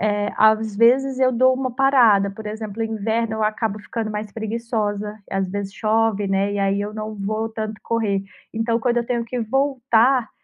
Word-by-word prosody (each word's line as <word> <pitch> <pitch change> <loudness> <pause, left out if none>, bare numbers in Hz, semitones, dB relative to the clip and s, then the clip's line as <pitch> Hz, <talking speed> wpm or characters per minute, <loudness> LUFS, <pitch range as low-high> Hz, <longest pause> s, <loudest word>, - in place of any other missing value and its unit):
eh, 205 0 0
às 220 -1 +3
vezes 260 +4 +4
eu 255 -1 +4
dou 255 +2 +4
uma 260 0 -2
parada. 240 -7 +4
Por 215 +2 -10
exemplo, 215 0 -6
o - - +1
inverno 220 +1 -1
eu 220 - -2
acabo 215 -1 -1
ficando 215 +1 -4
mais 210 0 -5
preguiçosa. 215 -2 -3
Às 195 -1 -1
vezes 200 0 -4
chove, 220 -2 +1
né, 195 +1 +1
e - - -2
aí 195 0 +1
eu 210 +1 -4
não 215 0 -5
vou 215 +2 -2
tanto 215 -1 -5
correr. 210 -4 0 0.3
Então, 230 +1 0
quando 240 0 +1
eu 235 - -1
tenho 235 -2 -1
que 250 +2 -4
voltar, 255 0 +2
220 Hz, 190 wpm, -21 LUFS, 205-235 Hz, 0.3 s, vezes